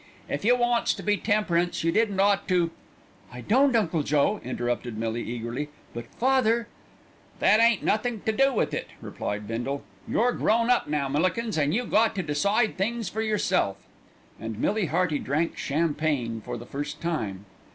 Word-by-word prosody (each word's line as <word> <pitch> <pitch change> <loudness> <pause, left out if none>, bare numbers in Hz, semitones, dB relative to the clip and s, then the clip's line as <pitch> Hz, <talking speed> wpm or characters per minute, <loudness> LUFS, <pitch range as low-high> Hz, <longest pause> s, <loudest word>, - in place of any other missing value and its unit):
"If - - -3
you 240 +4 +5
wants 240 -1 +1
to - - -8
be 210 0 +2
temperance 180 -6 0
you 165 - +2
didn't 205 -1 +1
ought 200 0 +3
to 175 -3 +2 0.3
" - - -28
"I 125 - -8
don't, 260 - +3
Uncle 175 -8 +1
Joe," 145 +8 +1
interrupted 120 -2 -3
Millie 115 +1 -2
eagerly; 120 +5 -4 0.2
"but 120 0 -6
father 235 -2 +2 0.4
" - - -29
"That 215 - +5
ain't 230 -2 +4
nothink 220 0 0
to 220 - +2
do 270 +5 +3
with 235 - 0
it," - - -3
replied 105 0 -5
Bindle. 120 +5 -3 0.2
"You're 245 +2 +2
grown 230 +1 +2
up 245 - +2
now, 145 -2 0
Millikins, 185 - 0
an' 145 -2 +1
you 245 +8 0
got 220 0 +2
to 185 - -1
decide 200 +10 +1
things 225 0 -1
for 220 +4 -3
yourself." 190 - +1 0.6
And 110 -1 -5
Millie 205 - 0
Hearty 165 -1 +1
drank 155 +5 -1
champagne 145 -6 -1
for - - -5
the 120 - -9
first 145 +3 -5
time. 110 - -3
175 Hz, 175 wpm, -26 LUFS, 140-220 Hz, 0.6 s, you